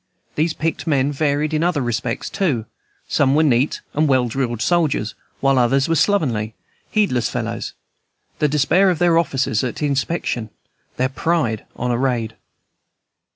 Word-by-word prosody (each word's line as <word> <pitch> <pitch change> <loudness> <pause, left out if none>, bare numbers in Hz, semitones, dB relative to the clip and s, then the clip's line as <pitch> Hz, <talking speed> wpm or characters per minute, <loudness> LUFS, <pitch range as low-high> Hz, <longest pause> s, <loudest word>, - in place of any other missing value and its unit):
These 160 +2 0
picked 165 +1 -2
men 140 -2 +2
varied 145 +1 0
in 155 - +1
other 170 -5 +1
respects 120 +1 -2
too; 150 - -1 0.4
some 140 -1 +2
were 155 - +4
neat 135 -1 +2
and 155 +1 +2
well 130 -3 +3
drilled 120 -1 -2
soldiers, 150 -7 +1 0.3
while 135 -1 +3
others 135 +3 +3
were 165 - +1
slovenly, 125 - +1 0.3
heedless 195 - +1
fellows, 115 -2 -4 0.7
the 150 - +3
despair 150 +7 +3
of 180 - +1
their 170 0 +4
officers 135 -8 0
at 130 +4 -3
inspection, 140 -5 -1 0.5
their 130 +1 +1
pride 130 -6 -1
on 125 0 -2
a 120 - 0
raid. 120 -4 -1
135 Hz, 150 wpm, -20 LUFS, 120-160 Hz, 0.7 s, were